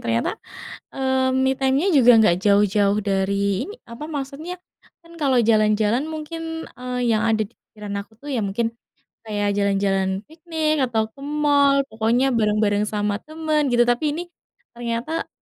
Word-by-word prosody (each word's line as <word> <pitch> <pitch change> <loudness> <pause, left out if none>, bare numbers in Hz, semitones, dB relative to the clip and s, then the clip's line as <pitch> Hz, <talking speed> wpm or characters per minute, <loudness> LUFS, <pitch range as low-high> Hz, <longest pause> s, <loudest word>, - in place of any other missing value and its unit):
Ternyata, 115 0 0 0.7
eee, 265 -1 +1 0.2
me 265 - +3
time-nya 270 +5 +2
juga 250 -3 +7
enggak 210 -6 +5
jauh-jauh 205 0 +3
dari 195 0 +1 0.4
ini 415 - -7 0.2
apa 235 +5 -7
maksudnya, 285 +5 -5 0.5
kan 335 - -16
kalau 270 -3 +3
jalan-jalan 215 +3 +3
mungkin, 315 +1 -6 0.4
eee, 250 0 -4
yang 215 - +1
ada 220 -1 +2
di - - -31
pikiran 210 -1 -9
aku 205 +2 -13
tuh 290 - -10
ya - - 0
mungkin 210 +4 -1 0.6
kayak 205 -1 -1
jalan-jalan 195 -1 +1 0.2
piknik, 320 -1 -2
atau 230 -3 0
ke 275 - -17 0.2
mall 285 -1 +4
pokoknya 230 +4 +1
bareng-bareng 210 -1 +2
sama 205 -1 -1
temen 310 -1 -1
gitu, 240 0 +5
tapi 245 +4 +1
ini 340 - -3 0.5
ternyata 235 +6 -3
235 Hz, 150 wpm, -22 LUFS, 210-280 Hz, 0.7 s, juga